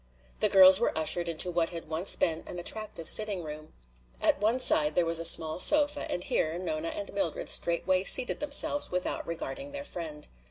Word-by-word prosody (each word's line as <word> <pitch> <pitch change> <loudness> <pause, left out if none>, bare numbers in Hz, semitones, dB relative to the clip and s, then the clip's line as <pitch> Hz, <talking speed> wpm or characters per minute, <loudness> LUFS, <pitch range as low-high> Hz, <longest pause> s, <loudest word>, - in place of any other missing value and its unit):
The - - +1
girls 190 0 +7
were 235 - -2
ushered 170 +2 0
into 170 +2 -3
what 170 -1 -1
had 165 -2 -9
once 160 +4 +3
been 160 -1 -2
an - - -8
attractive 175 -2 -2
sitting 205 -5 +2
room. 155 0 -11 0.5
At - - 0
one 220 +4 0
side 155 -11 +1
there 175 - +1
was 165 0 +1
a 165 - -4
small 160 0 +3
sofa 295 +5 +3
and 180 - -4
here 160 -1 -3
Nona 310 - -5
and 310 -1 -7
Mildred 195 -5 -4
straightway 185 +2 +1
seated 250 +5 +3
themselves 290 0 0
without 180 0 -4
regarding 275 - -8
their 285 0 -8
friend. 155 - -9
180 Hz, 190 wpm, -27 LUFS, 165-230 Hz, 0.5 s, girls